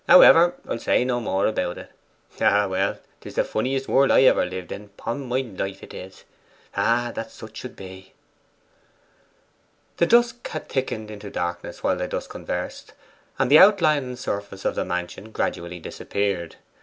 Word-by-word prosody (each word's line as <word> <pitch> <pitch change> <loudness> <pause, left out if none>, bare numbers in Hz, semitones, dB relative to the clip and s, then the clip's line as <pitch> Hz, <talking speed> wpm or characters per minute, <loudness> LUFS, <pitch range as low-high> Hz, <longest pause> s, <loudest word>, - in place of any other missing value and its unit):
However 175 -1 +8
I'll - - -3
say 125 - +2
no 125 -1 0
more 100 -4 0
about 90 -5 -1
it....Ah, 105 0 -1
well! 95 +1 0 0.2
'tis - - -11
the - - +3
funniest 130 +4 -2
world 135 0 +4
ever 130 - +6
I - - +1
lived 90 -1 -6
in 105 - -6
upon 115 +6 -6
my 125 +2 +1
life 95 -5 -5
'tis. 95 +1 -10 0.5
Ah, 120 +1 +1
that 115 - -5
such 110 -1 -11
should 125 - -8
be!' 95 0 -11 1.8
The 170 - +3
dusk 240 +2 +3
had 155 - -6
thickened 110 -5 -3
into 105 -1 -8
darkness 85 -2 -4
while - - +2
they - - -2
thus - - -4
conversed, - - -6 0.4
and 135 0 +1
the 155 - +9
outline 175 -8 +6
and 125 -1 -7
surface 100 -5 -5
of - - +1
the - - -1
mansion 90 +4 -4
gradually 85 -4 -3
disappeared. 90 0 -3
110 Hz, 160 wpm, -24 LUFS, 95-130 Hz, 1.8 s, the